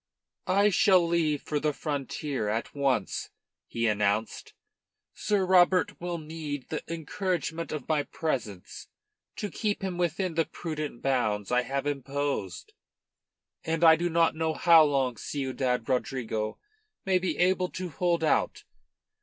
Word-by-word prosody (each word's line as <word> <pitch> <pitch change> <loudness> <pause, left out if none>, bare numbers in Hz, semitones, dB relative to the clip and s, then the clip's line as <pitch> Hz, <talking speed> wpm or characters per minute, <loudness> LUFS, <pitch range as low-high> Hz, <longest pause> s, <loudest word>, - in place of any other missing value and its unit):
"I 200 +3 +4
shall 185 -3 +4
leave 160 -4 +1
for 150 - -1
the 150 0 0
frontier 140 -5 -3
at 110 +2 -2
once," 135 -8 -1 0.4
he 115 0 -2
announced. 105 0 0 0.6
"Sir 205 -3 0
Robert 180 -1 +3
will 175 -1 -3
need 150 -3 -6
the 155 - -3
encouragement 165 0 -3
of 150 -4 -5
my 155 -2 +2
presence 120 - -4 0.5
to 205 - -4
keep 210 -3 -2
him 180 -2 -3
within 175 +1 0
the 165 0 +1
prudent 155 -6 -6
bounds 110 -7 0
I 125 0 +4
have 135 +3 -3
imposed. 140 -8 -3 0.9
And 165 +1 -1
I 160 -1 +9
do 175 +2 -1
not 165 0 +3
know 160 0 -1
how 165 -2 +7
long 135 -5 0
Ciudad 130 -3 -2
Rodrigo 120 -4 -2 0.5
may 190 -1 +3
be 185 0 -2
able 180 0 +2
to 185 -1 -5
hold 170 +2 0
out. 155 - +1
155 Hz, 135 wpm, -28 LUFS, 130-175 Hz, 0.9 s, I